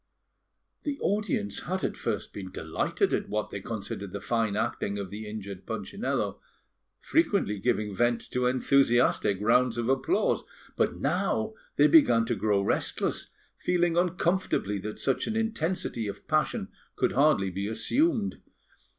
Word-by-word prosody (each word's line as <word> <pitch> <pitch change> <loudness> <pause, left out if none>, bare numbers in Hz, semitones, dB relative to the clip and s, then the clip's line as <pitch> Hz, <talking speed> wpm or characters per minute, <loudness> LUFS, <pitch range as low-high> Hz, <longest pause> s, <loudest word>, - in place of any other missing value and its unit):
The 290 -2 -3
audience 210 +1 -1
had 185 +1 -2
at - - -1
first - - -3
been 95 -2 -6
delighted 80 -3 -1
at - - -1
what 105 +1 -2
they 100 - -5
considered 100 -2 -5
the 100 - -3
fine 115 -1 0
acting 105 -2 -1
of 100 -2 -5
the 105 +1 -6
injured 100 -3 -7
Punchinello, 200 - -2 0.6
frequently 200 - +1
giving 105 -2 0
vent 120 +3 +2
to 125 0 +1
enthusiastic 125 -5 +3
rounds 120 +3 +3
of 120 +1 -1
applause; 360 - +1 0.3
but - - +1
now - - 0 0.2
they - - +5
began 120 - +6
to 120 0 0
grow 100 -1 +1
restless, - - 0 0.3
feeling 175 -1 +1
uncomfortably 175 - +1
that 105 +3 -6
such 135 - 0
an 220 - -2
intensity 185 - -1
of 100 - -7
passion - - 0 0.3
could - - +1
hardly 130 -9 +3
be 100 +2 -3
assumed. 240 - +1
120 Hz, 140 wpm, -28 LUFS, -, 0.6 s, began